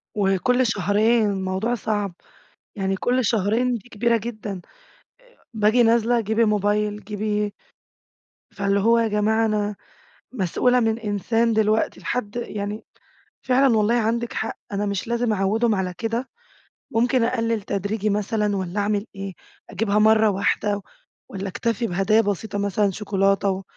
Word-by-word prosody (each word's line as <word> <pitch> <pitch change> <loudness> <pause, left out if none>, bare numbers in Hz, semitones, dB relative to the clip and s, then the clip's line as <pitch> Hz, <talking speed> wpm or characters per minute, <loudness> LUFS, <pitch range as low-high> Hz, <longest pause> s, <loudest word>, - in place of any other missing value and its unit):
وكل 210 +6 +2
شهرين. 210 +3 +2
الموضوع 190 +5 -1
صعب، 205 -4 -2 0.6
يعني 195 -1 -1
كل 250 +4 0
شهرين 225 +4 +1
دي 235 +1 -7
كبيرة 230 +1 +1
جدًا. 215 -4 -5 0.9
باجي 220 +3 +4
نازلة، 235 +1 +3
جيبي 220 +2 +1
موبايل، 210 0 0
جيبي 210 0 -2 1.0
فاللي 200 0 0
هو 230 +3 +4
يا 230 - +2
جماعة 220 +1 +1
أنا 210 -1 -1 0.6
مسؤولة 250 +4 +2
من 225 -1 +1
إنسان 225 +2 0
دلوقتي 215 0 +1
لحد 210 -3 -3
يعني 210 -3 -4 0.6
فعلًا 255 -2 +3
والله 215 +3 +2
عندِك 235 +1 0
حق، 220 - -4
أنا 205 +1 -1
مش 200 +1 -3
لازم 235 -1 0
أعوّدهم 215 +3 +1
على 185 -2 -2
كده، 230 +3 -2 0.6
ممكن 240 +2 +2
أقلّل 230 -3 0
تدريجي 205 +2 -2
مثلًا 210 0 0
والّا 190 +2 -2
أعمل 205 +1 0
إيه؟ 195 -1 -6 0.4
أجيبها 210 -1 0
مرّة 220 0 +5
واحدة 205 +1 0 0.5
والّا 195 0 -5
أكتفي 230 +4 -1
بهدايا 195 +3 +2
بسيطة 205 0 -2
مثلًا 200 0 +1
شكولاتة 195 0 +1
و 190 0 -3
210 Hz, 135 wpm, -23 LUFS, 200-230 Hz, 1.0 s, مرّة